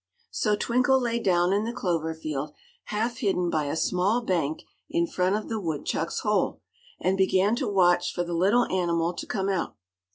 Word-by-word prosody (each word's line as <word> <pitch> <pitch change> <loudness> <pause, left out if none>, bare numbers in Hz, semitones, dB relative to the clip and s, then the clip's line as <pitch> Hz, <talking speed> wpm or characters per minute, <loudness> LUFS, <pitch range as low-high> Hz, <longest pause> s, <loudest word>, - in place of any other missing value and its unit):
So 210 -2 +1
Twinkle 255 +5 +2
lay 235 -2 -1
down 180 -3 +2
in 205 +1 +1
the 230 - -2
clover 165 -8 -2
field, 150 -2 -4 0.3
half 225 +3 -2
hidden 190 -7 0
by 155 -2 0
a 145 - -2
small 185 +8 +1
bank 165 -8 -1 0.3
in 340 +1 +1
front 190 - 0
of 215 - -3
the 225 -1 -2
woodchuck's 165 -1 -2
hole, 210 -1 0 0.4
and 190 - +1
began 190 +2 +3
to - - -1
watch 180 -3 +3
for 175 - -2
the 175 0 -5
little 200 +8 +3
animal 170 -2 0
to - - -7
come 195 -1 -1
out. 190 -3 -1
190 Hz, 185 wpm, -26 LUFS, 170-215 Hz, 0.4 s, began